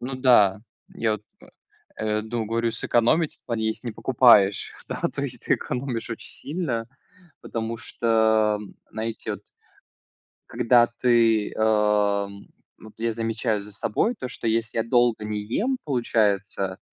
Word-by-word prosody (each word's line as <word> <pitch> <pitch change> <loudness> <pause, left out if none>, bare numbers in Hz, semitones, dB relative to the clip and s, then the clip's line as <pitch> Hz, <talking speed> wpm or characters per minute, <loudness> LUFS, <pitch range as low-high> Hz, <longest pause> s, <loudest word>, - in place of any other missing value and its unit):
Ну 130 +2 -4
да, 115 -7 +4 0.3
я 110 -2 -1
вот, 105 -1 -4 0.8
э, 110 0 -1
ду 110 0 -3
говорю 115 +1 0
сэкономить 120 +7 +1
в - - -42
плане, 110 -2 -1
если 115 +2 -4
не 110 - -4
покупаешь. 115 -6 +4
Да - - -5
то - - -3
есть - - -6
ты - - +3
экономишь 125 -3 -4
очень 115 - -7
сильно, 135 -8 -3 0.5
потому 115 0 -4
что, 110 -2 +2 0.3
знаете, 110 +1 -4
вот - - -8 1.1
когда 120 0 +4
ты 115 -3 +3
эм, 105 -2 +1 0.3
вот 110 -1 -13
я 115 0 -1
замечаю 110 -2 -1
за 105 +1 -11
собой 115 - -1
то, 130 - -4
что 115 - -5
если 115 0 0
я - - +1
долго 120 -2 +2
не 105 -1 -3
ем, 240 - -1
получается, 100 -7 0
115 Hz, 140 wpm, -24 LUFS, 105-120 Hz, 1.1 s, да